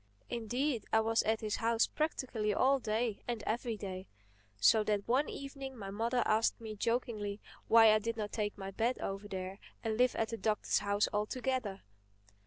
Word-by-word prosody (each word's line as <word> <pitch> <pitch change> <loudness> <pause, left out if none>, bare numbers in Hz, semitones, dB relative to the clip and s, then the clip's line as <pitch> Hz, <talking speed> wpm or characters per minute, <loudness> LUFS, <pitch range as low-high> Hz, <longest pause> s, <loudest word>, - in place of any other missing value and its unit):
Indeed 240 +2 -1
I 220 - +5
was 225 +1 +2
at 220 0 0
his 215 -2 -1
house 230 0 +3
practically 245 -9 -1
all 270 +1 +4
day 220 -1 -1
and 235 -3 -3
every 230 0 -1
day. 190 -2 -6 0.5
So 215 - +5
that 205 -1 0
one 260 +5 +2
evening 275 -1 -7
my 195 -3 -6
mother 230 +4 +1
asked 220 +1 +2
me 220 -2 -6
jokingly 220 -2 -1 0.3
why 225 -1 +8
I 215 - +4
did 230 +2 -3
not 210 -1 -3
take 210 -2 -2
my 195 -1 -6
bed 230 +5 0
over 195 +1 -4
there 190 0 -5 0.2
and 220 -1 -1
live 250 0 +3
at 225 - 0
the 230 - -4
Doctor's 215 -1 +1
house 205 +1 +1
altogether. 215 -1 -2
220 Hz, 180 wpm, -33 LUFS, 205-240 Hz, 0.5 s, why